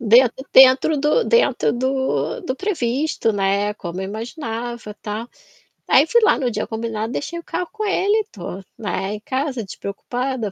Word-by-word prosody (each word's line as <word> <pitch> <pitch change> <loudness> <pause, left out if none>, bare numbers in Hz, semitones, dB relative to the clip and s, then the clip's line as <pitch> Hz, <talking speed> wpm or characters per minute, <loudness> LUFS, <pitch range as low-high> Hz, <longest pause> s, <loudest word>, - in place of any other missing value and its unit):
Dentro 235 +2 +5 0.2
dentro 265 +4 +7
do 300 - +2
dentro 275 - +3
do 265 - -1
do 270 -8 -4
previsto, 295 - 0
né, 200 +1 0
como 180 -2 -6
eu 190 - -3
imaginava, 230 0 -5
tal. 220 +3 -4 0.6
Aí 275 - +6
fui 470 +5 +4
lá 425 - +5
no 250 -3 0
dia - - -3
combinado, 225 0 -3
deixei 340 +5 -4
o 340 - -10
carro 360 - -3
com 435 0 -5
ele. 410 +2 +2
Tô, 180 -2 -7 0.2
né, 200 -2 -3
em - - -7
casa, 265 -2 -2
despreocupada, 230 +4 -4
245 Hz, 160 wpm, -21 LUFS, 215-295 Hz, 0.6 s, dentro